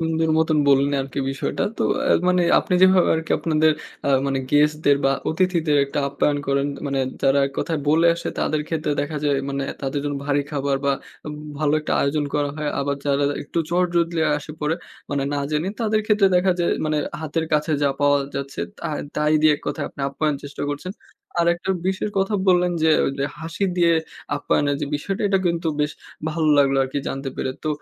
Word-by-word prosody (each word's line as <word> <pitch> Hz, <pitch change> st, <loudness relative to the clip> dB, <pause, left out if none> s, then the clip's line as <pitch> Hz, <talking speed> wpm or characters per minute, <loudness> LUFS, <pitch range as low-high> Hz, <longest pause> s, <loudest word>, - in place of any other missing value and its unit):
সুন্দর 160 Hz, 0 st, 0 dB
মতন 160 Hz, -1 st, +2 dB
বললেন 140 Hz, +1 st, +4 dB
আরকি 135 Hz, +1 st, -6 dB
বিষয়টা। 135 Hz, -, -2 dB
তো -, -, -1 dB, 0.2 s
আ -, -, +2 dB, 0.2 s
মানে 180 Hz, -1 st, +3 dB, 0.2 s
আপনি 180 Hz, -, -1 dB
যেভাবে 185 Hz, -1 st, +6 dB
আরকি 160 Hz, 0 st, -5 dB
আপনাদের 155 Hz, -1 st, +3 dB, 0.3 s
আ -, -, +2 dB, 0.2 s
মানে 135 Hz, -1 st, 0 dB
গেস্টদের 150 Hz, -1 st, +3 dB
বা, 135 Hz, -, +4 dB, 0.2 s
অতিথিদের 165 Hz, -3 st, +1 dB
একটা 140 Hz, -, -4 dB
আপ্যায়ন 145 Hz, +1 st, 0 dB
করেন 140 Hz, 0 st, +1 dB, 0.2 s
মানে, 140 Hz, -1 st, -1 dB, 0.2 s
যারা 135 Hz, +1 st, +4 dB
এক 135 Hz, -, -8 dB
কথায় 160 Hz, -2 st, -1 dB
বলে 165 Hz, +3 st, +4 dB
আসে 170 Hz, -, -5 dB
তাদের 155 Hz, -1 st, 0 dB
ক্ষেত্রে 155 Hz, -2 st, -1 dB
দেখা 150 Hz, +2 st, -3 dB
যায় 140 Hz, -1 st, +2 dB
মানে 140 Hz, 0 st, -2 dB, 0.2 s
তাদের 140 Hz, +1 st, -2 dB
জন্য 145 Hz, -1 st, -2 dB
ভারী 145 Hz, 0 st, +2 dB
খাবার 140 Hz, -2 st, 0 dB
বা, 140 Hz, -, +3 dB, 0.3 s
উব 150 Hz, -, -5 dB, 0.2 s
ভালো 150 Hz, -1 st, +1 dB
একটা -, -, -3 dB
আয়োজন 145 Hz, +1 st, +1 dB
করা 145 Hz, -1 st, +1 dB
হয়। 150 Hz, -1 st, -2 dB
আবার 140 Hz, 0 st, -1 dB
যারা 140 Hz, 0 st, +2 dB, 0.2 s
একটু 155 Hz, -, -4 dB
চট 180 Hz, +1 st, +3 dB
জলদি 170 Hz, -1 st, +1 dB, 0.2 s
আসে 155 Hz, +1 st, -9 dB
পড়ে, 150 Hz, +2 st, +1 dB, 0.4 s
মানে 140 Hz, -1 st, 0 dB
না -, -, -1 dB
জেনে, 155 Hz, +5 st, 0 dB
তাদের 215 Hz, -1 st, +2 dB
সেক্ষেত্রে 210 Hz, -2 st, +3 dB
দেখা 185 Hz, +1 st, +3 dB
যায় 170 Hz, -, +2 dB, 0.2 s
মানে 155 Hz, -1 st, 0 dB, 0.2 s
হাতের 160 Hz, +1 st, -2 dB
কাছে 150 Hz, +1 st, +1 dB
যা 140 Hz, -, +4 dB
পাওয়া 145 Hz, 0 st, +4 dB, 0.2 s
যাচ্ছে, 140 Hz, 0 st, -4 dB, 0.2 s
তাহ 160 Hz, -2 st, -4 dB, 0.2 s
তাই 150 Hz, 0 st, +2 dB
দিয়ে 155 Hz, -1 st, +5 dB
এক -, -, -18 dB
কথায় -, -, -2 dB
আপনি -, -, -11 dB
আপ্যায়ন 150 Hz, +2 st, -1 dB
চেষ্টা 145 Hz, 0 st, -7 dB
করছেন। 170 Hz, +6 st, -5 dB, 0.5 s
আর 170 Hz, -, +3 dB
একটা 175 Hz, +2 st, -4 dB, 0.2 s
বিশের 190 Hz, +2 st, -1 dB
কথা 195 Hz, +2 st, +1 dB
বললেন 180 Hz, -1 st, +4 dB
যে, 160 Hz, -, +4 dB, 0.2 s
ওইযে 135 Hz, 0 st, -2 dB
হাসি 165 Hz, +4 st, -3 dB
দিয়ে 170 Hz, -1 st, +4 dB, 0.4 s
আপ্যায়নের 145 Hz, 0 st, +1 dB
যে -, -, -1 dB
বিষয়টা, 195 Hz, +9 st, -3 dB
এটা 195 Hz, -1 st, +3 dB
কিন্তু 170 Hz, -1 st, 0 dB
বেশ 150 Hz, 0 st, 0 dB, 0.4 s
ভালো 155 Hz, 0 st, 0 dB
লাগলো 135 Hz, -1 st, +4 dB
আরকি 135 Hz, +2 st, -3 dB
জানতে 135 Hz, 0 st, -4 dB
পেরে। 130 Hz, -, -2 dB
তো -, -, 0 dB
150 Hz, 200 wpm, -22 LUFS, 140-170 Hz, 0.5 s, যেভাবে